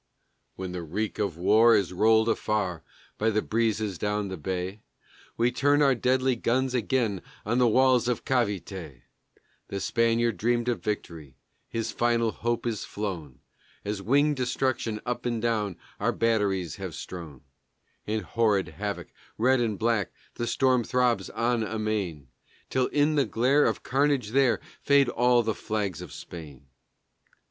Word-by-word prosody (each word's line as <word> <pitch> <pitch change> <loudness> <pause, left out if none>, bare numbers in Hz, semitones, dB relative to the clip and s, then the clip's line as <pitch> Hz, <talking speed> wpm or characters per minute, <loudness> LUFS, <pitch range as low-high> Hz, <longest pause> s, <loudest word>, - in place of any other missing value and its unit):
When 95 -1 -5
the 90 -1 -4
reek 100 +7 -3
of 100 -6 -1
war 110 +6 +5
is 100 -3 +1
rolled 110 +4 +4
afar 100 -7 -1 0.4
by 110 - +2
the 110 -1 0
breezes 110 -4 0
down 105 0 -1
the 95 - -4
bay 95 +4 -4 0.6
We 120 +2 +2
turn 145 +4 +3
our 135 -1 +5
deadly 130 +1 +1
guns 130 +3 0
again 115 -5 0 0.2
on 120 +4 +1
the 125 - +5
walls 130 +1 +4
of 125 -2 -1
Cavité. 95 - -2 0.6
The 100 - -4
Spaniard 115 +2 +1
dreamed 120 +1 +1
of 120 - -2
victory 85 -9 -4 0.3
his 115 -1 -2
final 115 -1 +1
hope 120 +1 -2
is 115 -3 -2
flown 90 -10 -5 0.4
As 100 -1 -3
winged 145 +6 +2
destruction 125 -3 -1
up 125 0 -2
and 120 -1 -1
down 110 -5 -1 0.2
our - - +1
batteries 100 -7 0
have 95 -5 -6
strown 80 -7 -8 0.7
In 110 +1 -1
horrid 105 +1 +1
havoc, - - -5 0.3
red 130 +3 +3
and 110 -4 -1
black, 115 -4 0 0.2
the 120 - -3
storm 130 +1 +2
throbs 125 0 +1
on 120 0 0
amain 105 -9 -3 0.4
Till 130 -1 +2
in 150 +1 +2
the 140 - +4
glare 130 +6 +3
of - - -1
carnage 135 -4 +1
there 130 0 +3 0.2
fade 140 -2 +4
all 120 0 +3
the 110 0 0
flags 100 -6 -3
of 90 -5 -9
Spain. 75 -6 -10
110 Hz, 150 wpm, -27 LUFS, 100-120 Hz, 0.7 s, war